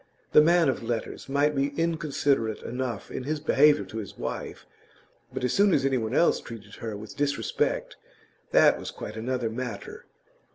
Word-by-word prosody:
The -, -, +8 dB
man 170 Hz, +1 st, +4 dB
of 135 Hz, -, 0 dB
letters 115 Hz, +3 st, -4 dB
might 145 Hz, +2 st, +2 dB
be 140 Hz, +2 st, -1 dB
inconsiderate 145 Hz, -8 st, 0 dB
enough 125 Hz, 0 st, -4 dB
in -, -, -4 dB
his 155 Hz, +1 st, -1 dB
behaviour 150 Hz, 0 st, +4 dB
to 110 Hz, -, -8 dB
his 100 Hz, -, -8 dB
wife, -, -, -5 dB, 0.7 s
but -, -, -5 dB
as 125 Hz, -, +1 dB
soon 200 Hz, -1 st, +4 dB
as 135 Hz, -, +1 dB
anyone 125 Hz, -3 st, 0 dB
else 170 Hz, -, +3 dB
treated 110 Hz, -3 st, -10 dB
her 110 Hz, -3 st, -5 dB
with 105 Hz, -2 st, -10 dB
disrespect 140 Hz, -1 st, -1 dB, 0.5 s
that -, -, +5 dB
was -, -, -6 dB
quite -, -, -7 dB
another 120 Hz, 0 st, -2 dB
matter. 130 Hz, -, -6 dB
135 Hz, 165 wpm, -27 LUFS, 115-150 Hz, 0.7 s, The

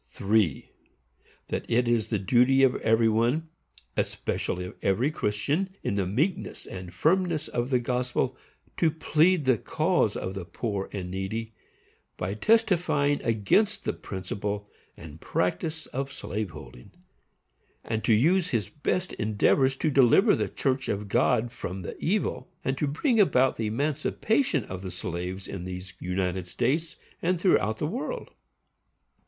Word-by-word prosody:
3. 100 Hz, -7 st, 0 dB, 0.8 s
That -, -, -2 dB
it 120 Hz, +1 st, +2 dB
is 120 Hz, -3 st, +2 dB
the 110 Hz, -, 0 dB
duty 125 Hz, +7 st, +4 dB
of 130 Hz, -2 st, +5 dB
every 115 Hz, +1 st, +3 dB
one, 120 Hz, +9 st, +1 dB, 0.5 s
especially 90 Hz, 0 st, -2 dB
of 90 Hz, -, -8 dB
every 115 Hz, +10 st, +2 dB
Christian, 150 Hz, -, -1 dB
in -, -, -1 dB
the 100 Hz, -2 st, 0 dB
meekness 150 Hz, -, -1 dB
and 90 Hz, -2 st, -8 dB
firmness 165 Hz, -, +1 dB
of 120 Hz, +1 st, -2 dB
the 130 Hz, -, +3 dB
gospel 125 Hz, +1 st, -1 dB, 0.4 s
to 165 Hz, -, +4 dB
plead 160 Hz, +1 st, +2 dB
the 130 Hz, -4 st, +3 dB
cause 160 Hz, -, +1 dB
of 95 Hz, -, -4 dB
the 95 Hz, -2 st, -5 dB
poor 100 Hz, +2 st, -3 dB
and 90 Hz, -3 st, -5 dB
needy, 110 Hz, +4 st, -4 dB, 0.6 s
by 90 Hz, +2 st, -2 dB
testifying 175 Hz, -, +2 dB
against 195 Hz, -, +2 dB
the -, -, -1 dB
principle 100 Hz, +2 st, -4 dB, 0.3 s
and 80 Hz, 0 st, -11 dB
practice 155 Hz, -, -1 dB
of 135 Hz, +1 st, -4 dB
slave 105 Hz, -6 st, -4 dB
holding; -, -, -12 dB, 0.9 s
and 110 Hz, -1 st, -2 dB
to 115 Hz, -, +4 dB
use 175 Hz, -, +3 dB
his 115 Hz, -5 st, -1 dB
best 180 Hz, +5 st, -2 dB
endeavors 115 Hz, +5 st, +2 dB
to 155 Hz, +3 st, 0 dB
deliver 140 Hz, -, +5 dB
the -, -, -1 dB
church 130 Hz, -1 st, -1 dB
of 100 Hz, 0 st, -2 dB
God 120 Hz, +1 st, +2 dB
from 95 Hz, -5 st, -6 dB
the -, -, -6 dB
evil; 205 Hz, +5 st, -1 dB, 0.2 s
and 135 Hz, -, +1 dB
to 150 Hz, -, +1 dB
bring 225 Hz, -, +1 dB
about 130 Hz, -10 st, +4 dB
the 110 Hz, -, -2 dB
emancipation 150 Hz, -, 0 dB
of 95 Hz, 0 st, -6 dB
the 95 Hz, -, -5 dB
slaves 90 Hz, +1 st, -5 dB
in 95 Hz, -3 st, -6 dB
these 90 Hz, 0 st, -7 dB
United 90 Hz, 0 st, -2 dB
States, 150 Hz, -, -1 dB, 0.3 s
and 180 Hz, +1 st, +1 dB
throughout 110 Hz, -, +2 dB
the -, -, -2 dB
world. 255 Hz, -, -4 dB
120 Hz, 150 wpm, -27 LUFS, 100-155 Hz, 0.9 s, of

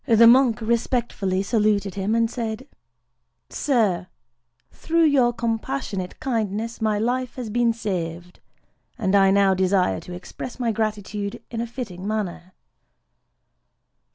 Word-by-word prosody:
The 230 Hz, -1 st, +6 dB
monk 240 Hz, -1 st, +6 dB
respectfully 225 Hz, -4 st, 0 dB
saluted 205 Hz, -2 st, +1 dB
him, 200 Hz, +3 st, -1 dB
and 230 Hz, 0 st, +3 dB
said:—"Sir, 175 Hz, -, -3 dB, 0.6 s
through 335 Hz, +1 st, +1 dB
your 270 Hz, -5 st, +4 dB
compassionate 230 Hz, -4 st, -3 dB
kindness 225 Hz, -2 st, -2 dB
my 215 Hz, -1 st, +1 dB
life 245 Hz, +3 st, -1 dB
has 240 Hz, -4 st, -5 dB
been 240 Hz, +1 st, +2 dB
saved; 180 Hz, -6 st, -4 dB, 0.6 s
and 200 Hz, -5 st, 0 dB
I 195 Hz, -1 st, +6 dB
now 195 Hz, 0 st, +4 dB
desire 185 Hz, -, +2 dB
to 180 Hz, -, -10 dB
express 180 Hz, +8 st, -8 dB
my 235 Hz, -2 st, +1 dB
gratitude 210 Hz, -2 st, -3 dB
in 230 Hz, -1 st, -3 dB
a 235 Hz, -, -3 dB
fitting 205 Hz, -7 st, -6 dB
manner." 185 Hz, -4 st, -3 dB
215 Hz, 120 wpm, -23 LUFS, 190-235 Hz, 0.6 s, The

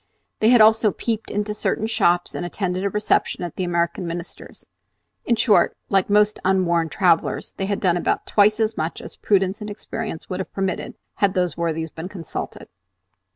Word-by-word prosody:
They 215 Hz, -, +4 dB
had 240 Hz, -2 st, +6 dB
also 220 Hz, 0 st, +5 dB
peeped 225 Hz, +1 st, -3 dB
into 210 Hz, +1 st, -2 dB
certain 210 Hz, +1 st, -1 dB
shops, 175 Hz, -5 st, +1 dB
and -, -, -4 dB
attended 180 Hz, +1 st, -2 dB
a 200 Hz, -, +1 dB
reception 210 Hz, -2 st, 0 dB
at 175 Hz, -, -5 dB
the 185 Hz, -, -2 dB
American 170 Hz, +1 st, -1 dB
Minister's, 170 Hz, +1 st, -8 dB, 0.6 s
in 235 Hz, -, +2 dB
short, 225 Hz, -1 st, +3 dB
like 195 Hz, -1 st, +2 dB
most 210 Hz, +1 st, +3 dB
unwarned 170 Hz, -3 st, +1 dB
travellers, 180 Hz, -5 st, +1 dB
they 195 Hz, -, -2 dB
had 200 Hz, 0 st, -1 dB
done 180 Hz, -3 st, +2 dB
about -, -, -1 dB
twice 210 Hz, +1 st, +3 dB
as 220 Hz, 0 st, +1 dB
much 160 Hz, +2 st, -3 dB
as -, -, -10 dB
prudence 195 Hz, 0 st, +1 dB
and 210 Hz, -, -5 dB
experience 210 Hz, -3 st, -6 dB
would 185 Hz, -, -4 dB
have 190 Hz, -, -5 dB
permitted, 190 Hz, -2 st, -3 dB, 0.2 s
had 200 Hz, -2 st, +2 dB
those 180 Hz, -2 st, 0 dB
worthies 160 Hz, -1 st, -2 dB
been 165 Hz, +3 st, -7 dB
consulted. 175 Hz, -5 st, -7 dB
190 Hz, 180 wpm, -22 LUFS, 175-210 Hz, 0.6 s, had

